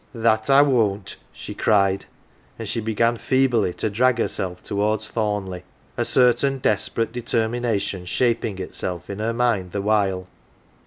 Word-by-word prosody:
" - - -35
That 110 0 +1
I 140 +1 +7
won't! 110 -9 0
" - - -35
she - - -8
cried, 100 -2 +2 0.5
and - - -6
she 115 - -2
began 115 +2 +1
feebly 125 -7 +2
to - - -1
drag 125 +3 +2
herself 90 -5 -2
towards 105 +1 -1
Thornleigh 105 -5 -2 0.3
a - - -1
certain 130 +2 +3
desperate 115 -1 0
determination 115 -5 -1
shaping 115 -1 0
itself 90 -1 -5
in 100 - -6
her 110 +2 0
mind 115 -7 0
the 100 - -1
while. 100 -3 +1
110 Hz, 150 wpm, -22 LUFS, 100-120 Hz, 0.5 s, I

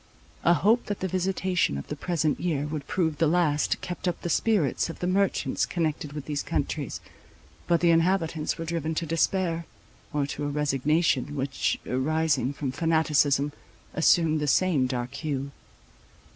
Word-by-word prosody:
A 170 - +5
hope 215 +10 +2
that 205 - -3
the 190 - -1
visitation 185 - 0
of 70 - -6
the 150 - -5
present 155 -1 -1
year 155 -5 -1
would 150 -2 -5
prove 160 -5 0
the 165 - +4
last, 155 -3 +2
kept 180 +1 -5
up 175 - -1
the 175 - -1
spirits 190 - +1
of 165 - -6
the - - -3
merchants 195 +1 +1
connected 155 -4 -2
with 150 -2 -6
these 145 -2 -2
countries; - - -3 0.7
but 170 -1 +3
the 170 -1 +5
inhabitants 165 -2 +1
were 165 - -4
driven 160 -1 -2
to 165 - -1
despair, 165 +1 0 0.4
or 145 -1 0
to 145 +1 -4
a - - 0
resignation 145 0 +1
which, 135 -1 -1
arising 140 0 +1
from 140 -2 -3
fanaticism, 150 -2 +2 0.4
assumed 160 -1 +3
the 150 - -1
same 145 -1 +3
dark 125 -1 -3
hue. 140 -3 -3
160 Hz, 160 wpm, -27 LUFS, 145-175 Hz, 0.7 s, A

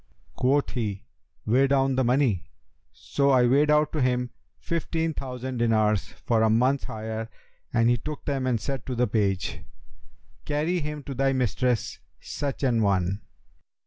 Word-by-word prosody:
Quoth 140 +3 +1
he, 105 -5 -3 0.4
'Weigh 130 +5 +4
down 135 -1 +2
the 130 - +2
money.' 125 -6 +2 0.5
So 140 0 0
I 130 -2 +5
weighed 140 +5 +3
out 150 0 +3
to 155 - 0
him 125 -1 0 0.3
fifteen 165 -1 -2
thousand 130 -2 -5
dinars 110 -4 +2 0.2
for 115 -2 +2
a 110 - +4
month's 125 +5 +2
hire 110 +1 -5 0.4
and 115 -1 +3
he 120 0 +4
took 150 +6 -7
them 135 -3 -1
and 120 -3 +1
said 135 +1 -4
to 130 - -2
the 125 +1 +2
page, 100 -4 -1 0.8
'Carry 155 +5 0
him 150 -1 -5
to 140 - -6
thy 135 +1 +1
mistress 125 -1 0 0.2
such 140 0 -4
an 120 -4 +2
one!' 95 -1 +1
125 Hz, 155 wpm, -26 LUFS, 110-140 Hz, 0.8 s, I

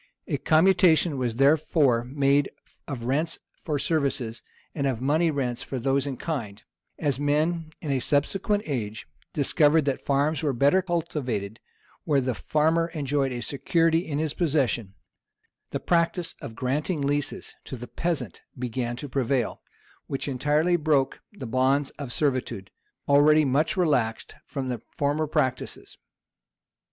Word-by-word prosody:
A - - -1
commutation 165 -1 +4
was 120 -3 -1
therefore 140 -2 +3
made 140 +2 +2 0.4
of 130 -5 -5
rents 150 +7 0 0.3
for 150 -2 -1
services, 135 -7 -1 0.3
and 140 -2 -1
of 130 -4 -1
money 155 +6 +2
rents 130 -5 -2
for 135 - -5
those 135 +2 +1
in 135 -3 -4
kind; 115 -11 -4 0.3
and 155 - -3
as 140 -2 0
men, 155 +3 0
in 150 - -3
a 135 - +1
subsequent 195 - +1
age, 110 -7 -4 0.2
discovered 150 +1 +3
that 140 -2 -1
farms 140 +1 +1
were 145 -3 0
better 140 +9 +4
cultivated 145 - -3 0.4
where 145 -2 +2
the 130 -1 -1
farmer 160 +6 +1
enjoyed 140 -2 0
a 120 -1 -4
security 165 +5 +1
in 155 -4 -4
his 155 -1 -1
possession, 130 - 0 0.7
the - - -3
practice 170 0 +1
of 110 - -7
granting 145 +7 -1
leases 145 0 -2
to 130 - -6
the 120 - -7
peasant 165 +7 -3 0.2
began 120 -1 -3
to 145 +4 -6
prevail, 130 -2 -1 0.5
which 135 - -3
entirely 150 +6 +2
broke 150 -4 +1
the 205 -10 -8
bonds 130 +4 +1
of 140 -4 -5
servitude, 130 -9 -1 0.4
already 150 +2 +5
much 155 +10 +1
relaxed 125 -11 +1
from 135 -2 -4
the 125 -4 -3 0.2
former 145 +2 +1
practices. 130 -3 -2
140 Hz, 145 wpm, -26 LUFS, 130-155 Hz, 0.7 s, already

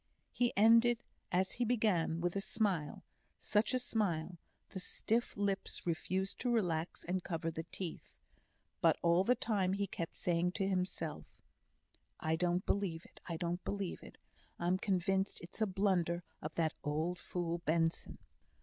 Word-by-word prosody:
He 245 -1 +2
ended, 230 +2 +6 0.3
as 185 +1 +2
he 245 - -1
began, 210 -9 +2
with 175 +1 0
a 200 - 0
smile 195 -8 -1 0.3
such 210 +2 +2
a - - +4
smile! 180 -8 -1 0.3
the 190 - -5
stiff 225 +5 0
lips 200 -1 -1
refused 185 +3 -1
to 250 - 0
relax 175 -7 0
and 180 +1 -1
cover 165 -2 -2
the 160 +1 -5
teeth. 180 -4 -5 0.6
But - - +5
all 170 +2 +5
the 250 +5 +4
time 195 -6 +1
he 200 +1 0
kept 170 -3 -5
saying 175 0 +1
to 195 -1 0
himself: 180 -4 -2 0.9
"I 160 0 +1
don't 175 +2 +1
believe 185 -5 0
it - - -17
I 170 -2 -2
don't 175 +2 -2
believe 200 -3 -3
it. - - -12 0.4
I'm 180 +2 +1
convinced 190 0 +1
it's 175 +5 -8
a 220 - +4
blunder 180 -3 +1 0.2
of 155 +1 -5
that 160 -2 +1
old 160 +5 -1
fool 170 -1 -2
Benson." 165 0 0
180 Hz, 155 wpm, -35 LUFS, 170-200 Hz, 0.9 s, ended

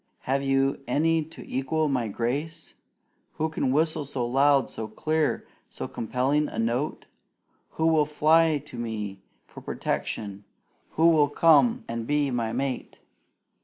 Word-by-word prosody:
Have 135 +1 0
you 135 0 +1
any 160 +5 +2
to 160 - -12
equal 150 +4 0
my 125 -5 0
grace? 145 +10 -3 0.6
Who 160 +1 -1
can 145 -4 -1
whistle 155 +2 +1
so 135 -3 -3
loud, 135 +2 +3
so 110 - -6
clear, 155 +7 -1 0.2
so - - -6
compelling 130 +6 0
a - - -8
note? 120 +6 -1 0.7
Who 160 - -1
will 160 -2 +4
fly 155 +1 +4
to 125 - -10
me 105 -4 -4 0.2
for - - -12
protection? 100 -2 -4 0.5
Who 165 +1 +5
will 150 -3 +4
come 230 +10 +4
and 115 0 -4
be 145 -1 +1
my 115 -2 -1
mate?" 130 +2 -3
140 Hz, 140 wpm, -26 LUFS, 120-155 Hz, 0.7 s, Who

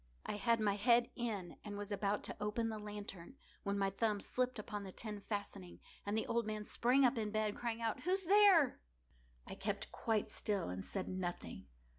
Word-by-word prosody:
I - - -2
had 230 +1 +3
my 205 -2 +2
head 240 +3 +4
in, 215 -8 -3
and 205 -1 -5
was 205 0 -5
about 205 0 0
to - - -5
open 225 +2 0
the 220 -1 -4
lantern, 205 -1 -7 0.3
when 200 0 -1
my 195 -1 +1
thumb 210 +1 +1
slipped 255 +4 -1
upon 210 -1 -4
the 190 - -7
tin 210 +1 -5
fastening, 200 -3 -5 0.3
and 205 +2 +1
the 220 - 0
old 235 -1 0
man 215 -1 -3
sprang 255 +5 +4
up 245 -1 +3
in 215 -1 -1
bed, 215 -1 0
crying 235 -1 -3
out—"Who's 360 - 0
there?" 385 -6 +6 0.7
I - - -7
kept - - -3
quite 220 -2 0
still 200 - -1
and 90 +1 -4
said 190 -2 -3
nothing. 175 - -4
210 Hz, 190 wpm, -37 LUFS, 200-235 Hz, 0.7 s, there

